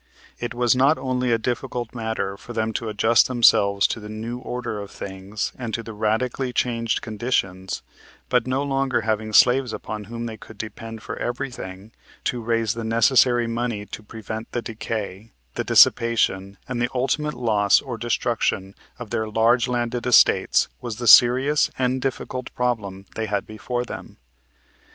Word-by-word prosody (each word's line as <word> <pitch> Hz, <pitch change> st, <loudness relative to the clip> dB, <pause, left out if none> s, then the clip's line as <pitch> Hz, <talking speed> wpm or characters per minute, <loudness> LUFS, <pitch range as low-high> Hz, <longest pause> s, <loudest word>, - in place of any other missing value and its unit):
It 120 Hz, 0 st, -4 dB
was 120 Hz, 0 st, +3 dB
not 135 Hz, +5 st, +4 dB
only 125 Hz, -1 st, -1 dB
a 115 Hz, -, +4 dB
difficult 120 Hz, +1 st, -3 dB
matter 110 Hz, -4 st, -3 dB
for 120 Hz, +4 st, -10 dB
them 110 Hz, 0 st, -1 dB
to 115 Hz, -, -3 dB
adjust 115 Hz, +3 st, +4 dB
themselves 100 Hz, -5 st, +4 dB
to -, -, 0 dB
the 105 Hz, -1 st, -9 dB
new 115 Hz, +3 st, -5 dB
order 120 Hz, -4 st, -4 dB
of 100 Hz, -1 st, -7 dB
things 100 Hz, +2 st, -5 dB
and 120 Hz, -3 st, -3 dB
to 115 Hz, -, -4 dB
the 115 Hz, -, -8 dB
radically 115 Hz, +5 st, -1 dB
changed 115 Hz, -2 st, -1 dB
conditions, 100 Hz, -5 st, -2 dB, 0.4 s
but 125 Hz, 0 st, +1 dB
no 130 Hz, +2 st, 0 dB
longer 135 Hz, -3 st, 0 dB
having 110 Hz, 0 st, -1 dB
slaves 125 Hz, +3 st, +5 dB
upon 105 Hz, -1 st, -6 dB
whom 115 Hz, +3 st, -6 dB
they 110 Hz, -1 st, -6 dB
could 110 Hz, 0 st, -13 dB
depend 110 Hz, +1 st, -7 dB
for -, -, -6 dB
everything, 110 Hz, -5 st, -5 dB, 0.3 s
to 125 Hz, -3 st, -1 dB
raise 115 Hz, -2 st, 0 dB
the 115 Hz, -, -5 dB
necessary 120 Hz, +2 st, +4 dB
money 115 Hz, -2 st, -2 dB
to 110 Hz, -, -8 dB
prevent 110 Hz, +1 st, -7 dB
the 120 Hz, -, -2 dB
decay, 110 Hz, -2 st, -5 dB, 0.2 s
the -, -, -2 dB
dissipation 100 Hz, -4 st, +3 dB
and 125 Hz, -2 st, -3 dB
the 120 Hz, -, +1 dB
ultimate 145 Hz, +4 st, 0 dB
loss 105 Hz, -5 st, +3 dB
or 130 Hz, -4 st, -6 dB
destruction 110 Hz, -4 st, -1 dB, 0.2 s
of 120 Hz, -4 st, -9 dB
their 110 Hz, -1 st, -1 dB
large 115 Hz, +3 st, +3 dB
landed 120 Hz, 0 st, -2 dB
estates 125 Hz, -, +5 dB
was 120 Hz, -3 st, -4 dB
the 120 Hz, +3 st, -5 dB
serious 130 Hz, +6 st, +6 dB
and 130 Hz, 0 st, 0 dB
difficult 130 Hz, -1 st, -4 dB
problem 105 Hz, -6 st, -2 dB
they 110 Hz, -1 st, -3 dB
had 100 Hz, -1 st, -1 dB
before 120 Hz, +3 st, -4 dB
them. -, -, -9 dB
115 Hz, 165 wpm, -23 LUFS, 110-125 Hz, 0.4 s, serious